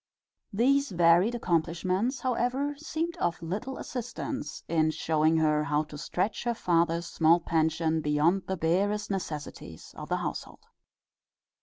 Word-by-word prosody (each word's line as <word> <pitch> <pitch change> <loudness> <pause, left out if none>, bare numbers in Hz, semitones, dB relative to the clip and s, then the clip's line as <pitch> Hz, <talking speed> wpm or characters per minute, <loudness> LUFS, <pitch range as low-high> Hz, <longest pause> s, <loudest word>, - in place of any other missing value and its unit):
These 275 +6 +2
varied 175 +6 +4
accomplishments, 185 - 0
however, 255 +3 0
seemed 325 +3 -3
of 170 - -1
little 205 +11 -4
assistance 255 +3 -5
in 160 -1 +2
showing 155 0 +1
her 150 -1 +2
how 150 +1 +1
to 150 -1 -12
stretch 185 +7 -2
her 240 -1 0
father's 170 -4 +1
small 165 +1 +3
pension 160 -1 0
beyond 155 +6 +1
the 190 - -2
barest 200 +6 0
necessities 150 - -6
of - - -8
the - - +1
household. - - -5
175 Hz, 130 wpm, -28 LUFS, 160-235 Hz, -, varied